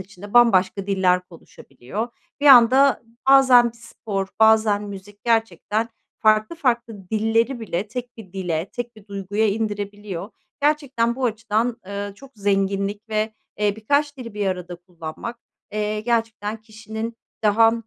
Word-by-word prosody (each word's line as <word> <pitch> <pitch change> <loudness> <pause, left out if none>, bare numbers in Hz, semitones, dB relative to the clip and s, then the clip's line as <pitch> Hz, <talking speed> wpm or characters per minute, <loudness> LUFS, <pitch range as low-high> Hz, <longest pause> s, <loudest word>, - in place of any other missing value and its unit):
içinde 200 +3 -11
bambaşka 195 -4 +4
diller 185 -2 +3
konuşabiliyor. 170 - -7 0.3
Bir 290 - +1
anda 265 +1 +7 0.3
bazen 255 -3 +7
bir - - -20
spor, 215 -4 -5
bazen 220 -2 +5
müzik 205 +1 -10
gerçekten 225 -1 0 0.3
farklı 215 +7 +3
farklı 235 - -1
dilleri 225 +3 +1
bile 205 -1 -3
tek 245 +1 -6
bir 205 -6 -12
dile, 175 -2 -2
tek 240 -1 -5
bir 210 -2 -16
duyguya 200 +2 -1
indirebiliyor. 205 -2 -4 0.3
Gerçekten 275 -6 +1
bu 260 - -2
açıdan, 225 +1 0
eee, 200 0 -4
çok 275 +4 -14
zenginlik 200 +1 -1
ve, 215 0 -1 0.3
eee, 205 -1 +1
birkaç 285 +6 0
dili 230 -5 -8
bir 205 -1 -1
arada 180 -2 -3
kullanmak, 175 +6 -8 0.4
eee, 210 0 -1
gerçekten 225 -2 -1
kişinin 220 +1 -7 0.3
daha, 225 +2 +5
215 Hz, 135 wpm, -22 LUFS, 200-235 Hz, 0.4 s, anda